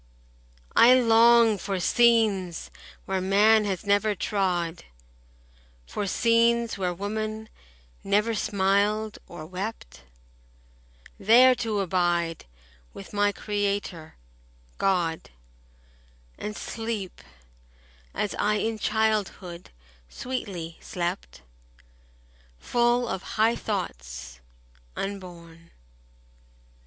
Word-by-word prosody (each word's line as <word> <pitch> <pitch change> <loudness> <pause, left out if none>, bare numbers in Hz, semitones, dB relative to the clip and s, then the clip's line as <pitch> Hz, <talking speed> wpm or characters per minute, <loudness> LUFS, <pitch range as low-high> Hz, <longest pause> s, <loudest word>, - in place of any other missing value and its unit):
I 245 +2 +8
long 230 -2 +5
for 195 +1 -3
scenes 215 -5 +2 0.3
where 190 -1 -1
man 210 +3 +4
has 195 0 -3
never 205 +1 +2
trod— 180 -4 -1 1.0
For 205 - -4
scenes 230 +2 +2
where 185 -3 -1
woman 215 +3 -4 0.5
never 210 +3 +1
smiled 205 +1 0
or 175 -3 -9
wept— 185 - -7 1.2
There 245 +6 +6
to 220 -4 -2
abide 175 -2 0 0.5
with 195 - -11
my 205 0 +2
Creator, 200 -6 -3 0.6
God, 175 -4 0 1.1
15 - - -8
And 210 - -6
sleep 225 -5 -5 0.9
as 210 - -1
I 210 +1 +2
in 220 +1 -2
childhood 210 -5 -1 0.4
sweetly 190 - -6
slept, 60 - -5 1.1
Full 240 - +1
of 190 - -3 0.2
high 225 +2 +3
thoughts, 65 - -5 0.6
unborn. 170 -4 -7
205 Hz, 85 wpm, -26 LUFS, 180-220 Hz, 1.2 s, I